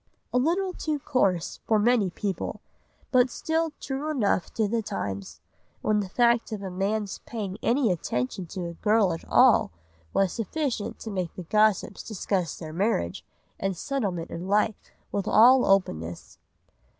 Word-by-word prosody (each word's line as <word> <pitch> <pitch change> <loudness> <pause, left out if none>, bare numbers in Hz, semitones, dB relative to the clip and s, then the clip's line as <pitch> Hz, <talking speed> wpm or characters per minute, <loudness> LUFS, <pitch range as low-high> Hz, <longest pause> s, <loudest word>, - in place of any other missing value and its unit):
A 250 - +4
little 365 +7 +1
too 310 -4 -2
coarse 200 - 0
for 220 - +4
many 215 -2 +3
people, 190 0 -4 0.5
but 255 -1 +5
still 320 +5 -1
true 275 +3 -3
enough 215 - +1
to 220 -2 +2
the 230 +2 0
times, 100 - -5 0.4
when 215 -1 +2
the 195 -2 -3
fact 235 +2 +2
of 210 -2 -4
a 190 - -4
man's 200 +2 -2
paying 205 -4 -5
any 240 -3 +2
attention 160 +1 -2
to 180 +2 -5
a 170 - -5
girl 210 0 +2
at 165 - -6
all 250 -3 +5 0.4
was 190 - +2
sufficient 240 - -2
to 220 - -5
make 185 -4 -3
the 180 - -6
gossips 210 +2 +2
discuss 190 -6 -2
their 155 -2 -7
marriage 175 - 0 0.4
and 195 -2 -2
settlement 195 -12 -2
in 175 +3 -5
life 210 +1 +1 0.2
with 200 -1 -2
all 250 +4 +6
openness. 85 - 0
205 Hz, 155 wpm, -26 LUFS, 180-240 Hz, 0.5 s, all